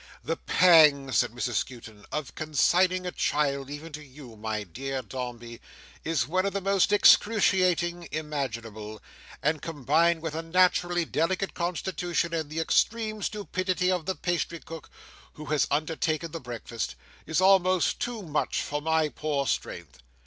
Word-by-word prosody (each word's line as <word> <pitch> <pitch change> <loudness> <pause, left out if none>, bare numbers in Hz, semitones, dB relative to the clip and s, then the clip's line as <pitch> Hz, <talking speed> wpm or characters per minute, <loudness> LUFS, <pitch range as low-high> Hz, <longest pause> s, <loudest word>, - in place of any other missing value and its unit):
"The - - -2
pang," 150 -6 +5
said - - +2
Mrs 120 -1 -2
Skewton, 115 -4 -6
"of 150 -1 -4
consigning 180 +4 +2
a 180 - -2
child, 140 -4 0
even 150 +3 -8
to 150 +1 -7
you, 130 -4 -13
my 110 0 -3
dear 130 +8 -5
Dombey, 120 -2 -7 0.4
is 155 -7 0
one 185 +4 +1
of 200 - -1
the 200 - -1
most 195 0 +2
excruciating 185 -5 +4
imaginable, 115 -8 -5 0.4
and 150 0 +1
combined 165 +2 +1
with 160 -2 -3
a 160 - -3
naturally 175 0 +2
delicate 185 +4 -1
constitution, 175 -1 -2
and 160 -3 -2
the 155 +2 -4
extreme 215 +5 +1
stupidity 185 -3 -1
of 180 -4 -2
the 190 - -1
pastry 170 -1 -2
cook 165 -1 -10 0.4
who 155 - -10
has 150 - +2
undertaken 155 +2 -1
the 165 - -5
breakfast, 120 -2 -5 0.3
is 160 - +1
almost 185 -2 +3
too 240 -4 -4
much 155 -4 -1
for 145 0 -3
my 160 0 +2
poor 150 -2 -2
strength. 75 - -4
160 Hz, 150 wpm, -27 LUFS, 135-180 Hz, 0.4 s, pang